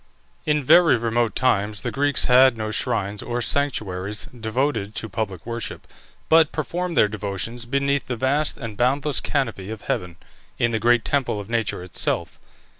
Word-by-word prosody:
In 150 -1 +2
very 165 +1 +6
remote 115 0 0
times 105 -4 +1
the - - -3
Greeks 145 +1 +2
had 130 -1 +6
no 110 0 -3
shrines 105 -4 -1
or 120 0 -3
sanctuaries 105 -7 -1
devoted 110 -2 -2
to 110 - -3
public 100 -4 -4
worship, 115 0 -5 0.4
but 160 -1 +5
performed 175 +3 -3
their - - +6
devotions 105 +3 -4
beneath 140 +2 0
the 125 - -2
vast 140 +5 0
and 115 -3 -7
boundless 135 +5 +1
canopy 115 -9 -2
of 110 -1 -6
heaven, 90 -2 -3 0.4
in 120 - +1
the 110 - 0
great 120 0 +3
temple 135 -7 0
of 100 +2 -8
nature 115 -6 -1
itself. 90 - -2
120 Hz, 160 wpm, -23 LUFS, 105-140 Hz, 0.4 s, very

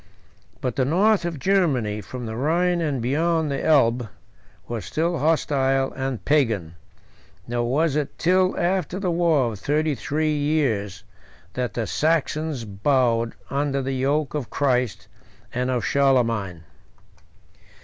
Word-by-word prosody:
But 125 -3 -3
the 130 - +3
north 185 +7 +3
of 170 -3 -3
Germany, 135 - +1
from 125 +3 -7
the 110 0 -5
Rhine 170 +7 +1
and 140 -7 -1
beyond 160 +4 +1
the 140 - -2
Elbe, 120 -6 +3 0.6
was 115 -4 -4
still 165 - -1
hostile 135 -3 +1
and 130 -3 -4
Pagan; 115 - +1 0.7
nor 120 0 -1
was 155 +1 +1
it 150 -2 -2
till 185 +2 +2
after 180 0 0
a 190 -3 -1
war 165 -8 +2
of 105 - -8
thirty 150 +5 0
three 150 +4 -1
years 120 - -1 0.5
that 125 -1 -3
the 115 - -1
Saxons 155 -2 0
bowed 115 +2 +1 0.2
under 140 -1 0
the 135 +1 -2
yoke 140 +3 0
of 145 -6 -3
Christ 125 -6 0 0.5
and 125 +1 -1
of 125 -2 -1
Charlemagne. 115 -11 +1
140 Hz, 135 wpm, -23 LUFS, 120-155 Hz, 0.7 s, the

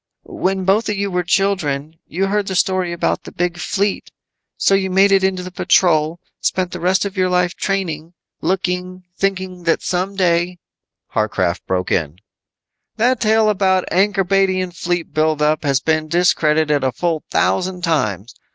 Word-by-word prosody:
"When 190 0 -2
both 205 +4 +2
of 210 - -1
you 200 0 -2
were 180 0 0
children 165 -5 -1
you 185 +4 -1
heard 200 0 -1
the 190 - -3
story 185 -1 +1
about 170 - -1
the - - -10
Big 175 0 -2
Fleet. 200 +3 -1 0.5
So - - +2
you 195 -1 +2
made 195 +2 +4
it 195 -1 +4
into 190 -1 0
the 185 - -8
Patrol, 165 -2 +2 0.2
spent 185 -1 -1
the 180 - -6
rest 185 +4 +1
of 200 0 -5
your 185 -1 +2
life 180 0 +1
training, 170 -5 -3 0.3
looking, 180 +1 -2
thinking 190 -2 -2
that 165 - +1
some 185 +2 -2
day 175 -1 +1 0.3
" - - -35
Warcraft 95 -4 -1
broke 90 -1 -1
in, 80 -2 -1 0.8
"That 245 +2 +2
tale 220 0 +3
about 190 -3 +2
an 195 +4 +3
Ankorbadian 190 -1 +1
fleet 175 -2 -3
build 155 0 +1
up 150 +1 +1
has 140 -3 +2
been 155 +2 0
discredited 155 -3 +2
a 130 - +1
full 165 +4 -2
thousand 180 -1 0
times. 115 - -1
180 Hz, 170 wpm, -19 LUFS, 160-190 Hz, 0.8 s, made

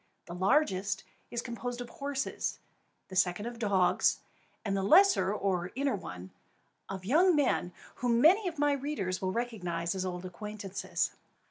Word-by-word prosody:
The 170 - -8
largest 195 - +1 0.3
is 240 0 -3
composed 245 0 -5
of 245 - -5
horses, 280 -1 -3 0.5
the 190 - -8
second 185 +2 +2
of 240 -1 -6
dogs, 190 -5 +3 0.5
and 200 -2 0
the 195 - 0
lesser 350 - +5
or 185 -3 -1
inner 275 -2 +1
one, 90 - -8 0.6
of 190 -1 -6
young 335 - +5
men, 260 -10 +1 0.3
whom 235 -1 +2
many 370 - +5
of 335 -2 -4
my 290 0 +3
readers 270 -10 -2
will 185 -1 0
recognise 180 -8 -2
as 190 -1 -2
old 180 -1 -4
acquaintances. 200 +1 -3
210 Hz, 150 wpm, -31 LUFS, 185-270 Hz, 0.6 s, lesser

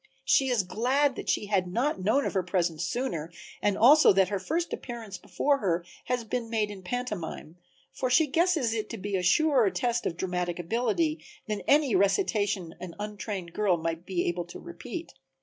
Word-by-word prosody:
She 270 -1 +4
is 240 -5 +2
glad 255 +9 +2
then - - -16
that - - -5
she - - +1
had 195 -3 +1
not 240 0 0
known 220 +9 +2
of - - -2
her 190 - +2
presence 175 -3 -1
sooner 175 -11 -3 0.3
and 205 -1 +1
also 290 +7 +7
that 190 -1 +3
her 200 -2 -1
first 330 - -2
appearance 225 -6 -6
before 280 +9 0
her 175 -5 0 0.2
has 250 -1 -1
been 230 +1 -3
made 215 -2 0
in 195 -2 -9
pantomime, 185 -6 -5 0.4
for 255 - -2
she 305 +6 +5
guesses 315 -5 +1
it 220 -2 -3
to 230 - -5
be 200 0 -3
a 185 - +1
surer 255 - +4
test 240 +2 -1
of 165 - -4
dramatic 180 -2 -2
ability 175 -5 0 0.2
than 210 -2 -2
any 280 -6 +4
recitation 200 - +1
an 175 -2 -8
untrained 205 -4 -5
girl 200 -4 +2
might 165 0 -3
be 180 -2 -1
able 175 0 -1
to 175 - -10
repeat. 345 0 -8
210 Hz, 190 wpm, -28 LUFS, 180-250 Hz, 0.4 s, also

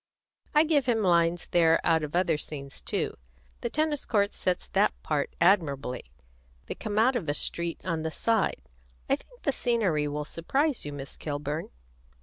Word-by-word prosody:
I 300 - +7
give 300 -5 +2
him 225 -3 +2
lines 170 -2 +3
there 165 -1 +5
out 160 -1 +3
of 150 +2 -4
other 175 -2 +3
scenes 140 -2 -6
too; - - -2 0.4
the - - -2
tennis 305 -1 0
court 205 -3 +1
sets 180 -1 -1
that - - +2
part - - -1
admirably; 145 - +2 0.6
they - - -4
come 210 -2 -4
out 245 +4 +4
of 180 -11 -2
a 145 - +1
street 170 +2 -1
at 165 -3 -1
the 160 - -2
side. 220 - 0 0.4
I - - +3
think - - -19
the 280 - +2
scenery 210 - +1
will 150 +1 -3
surprise 270 - -1
you, 145 - -4
Miss 140 -1 -7
Kilburn. 150 +1 -4
170 Hz, 170 wpm, -28 LUFS, 150-230 Hz, 0.6 s, I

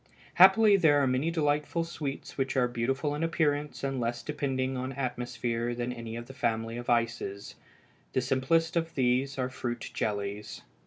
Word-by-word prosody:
Happily 200 +3 +7
there 155 -6 +5
are 140 - +3
many 130 +5 +1
delightful 150 0 0
sweets 150 -4 -5
which 135 0 -1
are 125 -1 +4
beautiful 130 +5 -1
in 150 - -3
appearance 150 -3 0
and 135 -1 -1
less 120 0 -2
depending 135 -3 -2
on 130 +1 -3
atmosphere 120 -2 -2
than 120 +1 -3
any 115 -1 -7
of 120 0 -6
the 135 - -11
family 115 -3 -1
of 120 0 -6
ices. 115 -4 -1 0.6
The 130 - +2
simplest 140 +6 +1
of 165 -1 -1
these 130 +1 +1
are 130 -1 0
fruit 120 -2 -4
jellies. 100 0 -3
130 Hz, 165 wpm, -29 LUFS, 120-145 Hz, 0.6 s, Happily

